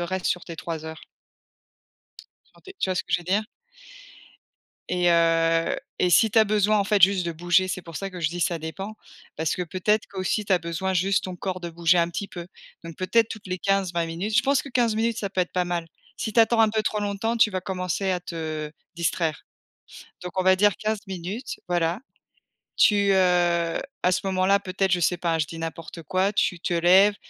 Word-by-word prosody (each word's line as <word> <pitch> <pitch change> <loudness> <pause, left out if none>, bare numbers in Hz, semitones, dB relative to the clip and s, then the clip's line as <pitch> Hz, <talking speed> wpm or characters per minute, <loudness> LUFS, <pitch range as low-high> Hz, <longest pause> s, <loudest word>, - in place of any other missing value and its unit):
reste 180 +1 -3
sur 180 - -1
tes 170 - -8
3 160 -1 -5
heures. 160 -1 -8 1.4
Sur - - -25
tes 385 - -12
tu 190 - 0
vois - - 0
ce - - -1
que - - -8
je 175 - +2
veux - - -13
dire? 195 +5 +1 1.5
Et 180 -1 +1
heu 165 0 +2 0.2
et 180 - +2
si 220 +5 +5
tu 225 - +3
as 220 - +6
besoin 210 0 +2
en 200 - +1
fait 205 0 +1
juste 190 0 +5
de 170 - -2
bouger, 175 +3 +2
c'est 185 0 -4
pour 165 -1 -11
ça 195 0 -4
que 180 -1 -8
je 160 - +1
dis 175 +2 -6
ça 170 0 0
dépend, 190 +7 -7 0.4
parce 160 0 -1
que 180 - -3
peut-être 190 +5 0
qu'aussi 195 +2 -2
tu 195 - 0
as 185 - +5
besoin 170 +3 -3
juste 190 +2 +1
ton 185 -1 -5
corps 185 0 -4
de 170 -1 -5
bouger 170 +1 +2
un 170 0 +2
petit 200 +4 -4
peu. 175 -2 -9 0.3
Donc 165 -2 -9
peut-être, 225 +4 +2
toutes 215 -3 -8
les 185 0 -3
15-20 180 -4 0
minutes, 210 +4 -1
je 250 - +5
pense 275 +1 +2
que - - -9
15 240 -4 +1
minutes, 225 0 0
ça 200 - -3
peut 185 - -1
être 180 - -2
pas 180 -1 +1
mal. 175 -1 -3 0.3
Si 220 - -3
tu 230 - +6
attends 225 0 +4
un 220 - +5
peu 220 0 0
trop 215 - -1
longtemps, 205 +3 -1
tu 220 - +5
vas 185 - -2
commencer 185 0 -2
à 180 - 0
te 155 -3 -5 0.3
distraire. 165 -2 -1 0.8
Donc 180 +1 -4
on - - +1
va 185 0 +5
dire 205 +1 +3
15 215 0 -2
minutes, 190 +6 -6
voilà. 175 +1 0 0.8
Tu, 200 -2 +4
heu, 175 -2 +2 0.2
à 180 - +4
ce 185 - +1
moment-là, 190 +1 +2
peut-être 190 0 -1
je 180 - +3
sais 175 +1 +2
pas 170 -2 0
hein, - - -2
je 155 - +1
dis 165 - -8
n'importe 165 0 -7
quoi, 185 +6 0
tu 180 -4 0
te 175 - -2
lèves, 185 +4 +5
185 Hz, 225 wpm, -25 LUFS, 170-200 Hz, 1.5 s, as